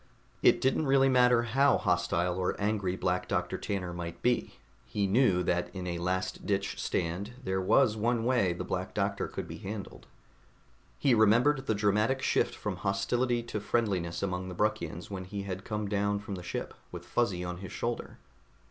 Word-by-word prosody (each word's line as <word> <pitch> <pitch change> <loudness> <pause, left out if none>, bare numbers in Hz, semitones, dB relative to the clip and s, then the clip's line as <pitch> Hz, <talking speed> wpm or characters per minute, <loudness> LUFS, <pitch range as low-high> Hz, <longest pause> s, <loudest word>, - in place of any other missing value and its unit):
It - - +5
didn't 135 +3 +2
really 135 0 +5
matter 125 -2 +5
how 135 +5 +3
hostile 90 0 +1
or 90 - -1
angry 100 -3 0
Black 90 -1 -1
Doctor 90 0 -1
Tanner 95 -4 -3
might 85 -1 -6
be; 125 0 +1 0.3
he 100 -1 -1
knew 100 -3 +3
that 90 0 0
in 90 -1 -4
a 85 -1 -3
last 95 +1 -2
ditch 100 -1 -1
stand 90 +7 -2
there 95 -3 -1
was 105 +3 +4
one 115 +1 +1
way 120 -8 +3
the 85 - -4
Black - - -4
Doctor - - 0
could - - -6
be - - -7
handled. 100 +1 -7 0.9
He 130 - +3
remembered 120 +6 +4
the 110 - +2
dramatic 105 +6 +1
shift - - +1
from - - -4
hostility 120 +5 0
to 115 -2 -4
friendliness 100 -6 -1
among 90 -1 -2
the 90 - -7
Bruckians 90 -4 -2
when 95 -1 -4
he 100 +1 -5
had 95 -1 -5
come 105 -1 -3
down 100 0 +1
from 100 0 -6
the 90 - -5
ship 90 - -4 0.2
with - - -8
Fuzzy 100 -7 0
on 90 0 -4
his 95 +1 -8
shoulder. 120 0 -4
100 Hz, 180 wpm, -30 LUFS, 90-115 Hz, 0.9 s, It